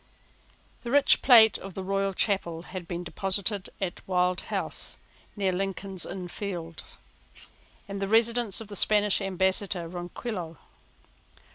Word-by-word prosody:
The 240 - -6
rich 285 +3 +5
plate 225 -5 +7
of 195 -2 -9
the 190 - -4 0.3
Chapel 195 -5 +1
Royal 165 - -7
had 180 -2 -8
been 175 +1 -4
deposited 195 +2 -1
at 190 -3 -4
Wild 180 -1 +1
House, - - -3 0.4
near 195 -3 0
Lincoln's 195 0 -1
Inn 185 -2 -6
Fields, 175 -3 -6 0.9
the 195 0 -3
residence 230 -1 +2
of 225 - -8
the 205 - -8
Spanish 210 0 +4
ambassador 190 -1 -1
Ronquillo. 175 0 -6
195 Hz, 125 wpm, -27 LUFS, 180-205 Hz, 0.9 s, plate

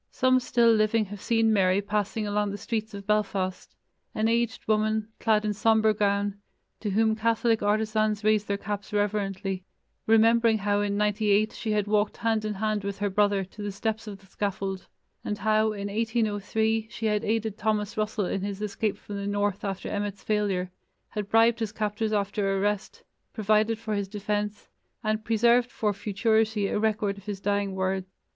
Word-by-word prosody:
Some 255 0 +3
still 235 -2 +3
living 215 0 +2
have 205 0 -9
seen 225 -1 +2
Mary 190 -1 +3
passing 210 +1 -1
along 205 0 0
the 200 - -4
streets 220 0 -3
of 200 0 -8
Belfast, 195 -3 -1 0.4
an 215 +1 +1
aged 235 +1 0
woman, 215 0 +1
clad 215 -2 +2
in 210 - 0
sombre 220 +1 +3
gown, 205 -1 0 0.4
to 210 - -3
whom 220 +2 +2
Catholic 230 0 +1
artisans 215 0 +1
raised 215 -1 +2
their 200 - 0
caps 205 0 -5
reverently, 195 -2 -1 0.4
remembering 225 0 +5
how 205 0 +1
in 205 0 -1
'98 210 0 +2
she 220 -2 -2
had 210 -1 +1
walked 210 0 +1
hand 225 -2 0
in 210 -1 -2
hand 215 0 -1
with 200 0 -4
her 205 -1 -1
brother 205 0 +2
to 190 +3 -11
the 205 0 -3
steps 220 +3 -3
of 205 -2 -6
the 195 - -22
scaffold, 195 -1 -3 0.4
and 210 - -3
how, 215 +1 +2
in 200 -1 -4
1803, 220 0 0
she 230 - -5
had 210 -1 +1
aided 220 -1 -1
Thomas 215 -1 -1
Russell 215 -1 -1
in 190 +1 -2
his 200 0 -4
escape 210 0 -2
from 205 - -7
the 200 0 -4
north 205 0 -1
after 195 -2 -3
Emmet's 205 -1 -3
failure, 200 -4 0 0.4
had 205 -1 -4
bribed 230 +1 +4
his 220 -2 -2
captors 215 0 -2
after 200 -1 0
arrest, 200 -1 -2 0.3
provided 215 +1 +2
for 220 -1 -4
his 200 -1 -1
defence, 210 +1 -3 0.4
and 215 0 0
preserved 235 +2 +3
for 210 -2 0
futurity 220 +1 +1
a 195 - 0
record 210 -2 0
of 195 - -18
his 205 -2 -4
dying 200 -1 -1
words. 190 0 -1
210 Hz, 180 wpm, -27 LUFS, 200-220 Hz, 0.4 s, remembering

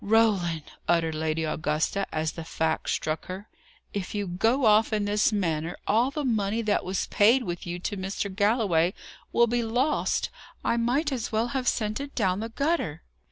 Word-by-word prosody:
"Roland!" 200 -7 +2 0.2
uttered 165 -2 +2
Lady 160 +1 -1
Augusta, 155 +5 -1
as 155 0 -1
the 165 - -7
fact 160 0 -1
struck 155 0 -2
her, 190 +3 -7 0.5
"if 200 0 -4
you 205 -1 -1
go 225 +9 +1
off 215 +1 +5
in 210 -1 +1
this 210 +2 +2
manner, 165 -5 -1
all 230 +5 +3
the 290 +1 -3
money 220 -2 0
that 210 -1 +1
was 185 +1 -1
paid 235 +5 +5
with 175 -3 -5
you 175 0 -3
to 195 +4 -3
Mr. 195 0 -3
Galloway 200 -5 +2 0.4
will 235 - +5
be 240 +1 0
lost! 245 +6 0 0.3
I - - +2
might 250 +6 +1
as 250 -5 -3
well 225 +2 +1
have 255 0 -2
sent 215 -1 0
it 280 0 -7
down 190 -4 +1
the 225 +1 -4
gutter." 280 - -1
205 Hz, 180 wpm, -27 LUFS, 175-230 Hz, 0.5 s, off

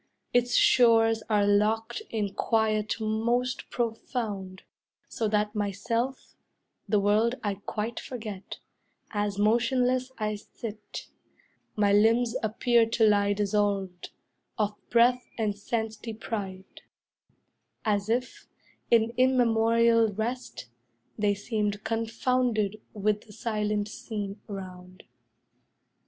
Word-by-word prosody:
Its 245 0 +2
shores 225 -2 +5
are 210 -2 +3
locked 220 - +1
in 205 -3 -2
quiet 215 -1 +1
most 235 +4 -1
profound; 220 -5 -3 0.4
So 225 - -2
that 210 0 0
myself, 230 +5 -2 0.6
the 210 - +3
world 215 +4 +2
I 205 -2 0
quite 220 +2 -3
forget, 215 -6 -7 0.5
As 205 -1 -1
motionless 250 +4 +2
I 215 -1 -2
sit; 210 0 -8 0.7
my 205 -1 +3
limbs 230 +3 +4
appear 230 +1 +2
To 225 -1 +3
lie 205 -1 +3
dissolved, 200 -3 -1 0.5
of 210 -2 0 0.2
breath 245 +1 +4
and 215 -3 0
sense 220 +1 -3
deprived; 205 -4 -6 1.0
As 205 -1 0
if, 245 +2 -2 0.4
in 230 0 +4
immemorial 230 -3 +4
rest, 230 - -4 0.5
they 205 -1 +1
seemed 210 -1 -2
Confounded 225 -2 0
with 210 +1 0
the 210 - -13
silent 210 -2 -1
scene 205 -2 -6
around. 185 -1 -9
220 Hz, 100 wpm, -28 LUFS, 205-230 Hz, 1.0 s, shores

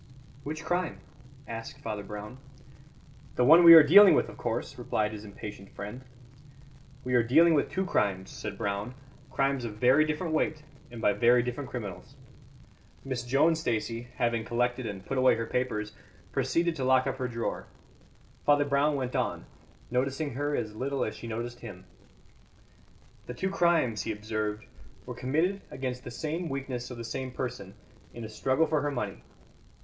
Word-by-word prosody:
"Which 155 +2 -6
crime?" 175 0 -1 0.5
asked 115 0 -7
Father 105 -1 -4
Brown. 105 +5 -8 1.0
"The 125 - +3
one 165 +6 +8
we 165 -1 +12
are 160 - +11
dealing 195 +7 +8
with, - - +1
of - - -12
course," - - -3
replied 105 0 -1
his 105 -1 -8
impatient 100 -1 -9
friend. 105 +6 -8 1.0
"We 125 - -3
are 120 - +5
dealing 160 +9 +5
with 145 - +1
two 190 0 -1
crimes," 95 - 0
said - - -6
Brown, 100 +5 -3 0.3
"crimes 135 -1 0
of 110 -3 -5
very 125 +7 +4
different 155 +2 -2
weight 155 -1 0 0.3
and 120 -2 -9
by 105 - +4
very 120 +4 +4
different 125 +3 -5
criminals." 105 -7 -7 0.9
Miss 130 -2 -3
Joan 140 +7 +3
Stacey, 120 -6 -2
having 120 -2 0
collected 120 +1 -1
and 100 -2 -7
put 135 - -2
away 130 0 +5
her 115 0 -3
papers, 110 -4 -2 0.4
proceeded 170 0 0
to 135 - -2
lock 130 0 +4
up 135 -1 -2
her 130 -1 -2
drawer. 115 -1 -4 0.8
Father 145 0 +4
Brown 140 +1 +2
went 130 -2 -3
on, - - -1 0.5
noticing 135 +3 -1
her 145 +3 -1
as 110 -2 -3
little 135 +3 -1
as 110 - -5
she 110 +2 -9
noticed 120 +2 -5
him. - - -10 1.4
"The 125 - -6
two 190 +9 -2
crimes," 165 - +2
he 110 - -3
observed, 105 0 -3 0.4
"were - - -6
committed 165 +10 0
against 130 -1 -5
the - - -7
same 160 +7 -4
weakness 130 -3 -4
of 125 - -8
the 115 - -6
same 130 +3 -4
person, 105 -7 -5 0.4
in 120 - -7
a 110 - -6
struggle 130 +7 +1
for 155 -2 0
her 145 - -1
money. 115 -8 -4
125 Hz, 170 wpm, -29 LUFS, 115-145 Hz, 1.4 s, we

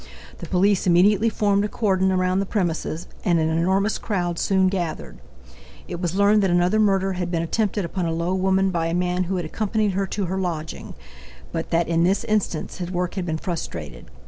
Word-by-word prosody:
The - - -7
police 195 +1 +2
immediately 200 +5 +4
formed 205 -2 +1
a - - 0
cordon 190 -4 +1
around 185 0 +1
the 195 - -1
premises 175 -4 -2 0.2
and 175 -2 +3
an 160 -1 +1
enormous 190 +6 +1
crowd 175 -5 -2
soon 190 -1 +2
gathered. 175 - -3 0.7
It 175 -1 -6
was 175 -1 -2
learned 205 +1 +4
that 195 - +2
another 175 +4 +2
murder 195 -2 +2
had 180 -1 -3
been 170 -1 -1
attempted 205 +2 -1
upon 175 0 -2
a - - -1
low 170 +2 -1
woman 190 0 +2
by 165 -2 -1
a 165 - -1
man 180 0 0
who 190 +2 -2
had 175 -3 -2
accompanied 215 +4 -1
her 195 +1 -1
to 200 +1 -2
her 190 +2 -2
lodging, 165 -4 -4 0.6
but - - -4
that 165 0 +1
in 165 0 +2
this 190 +3 +2
instance 210 -6 -1
his 175 -1 -4
work 180 -1 -2
had 185 -3 -3
been 160 -1 -1
frustrated. 85 - -6
185 Hz, 200 wpm, -23 LUFS, 170-195 Hz, 0.7 s, immediately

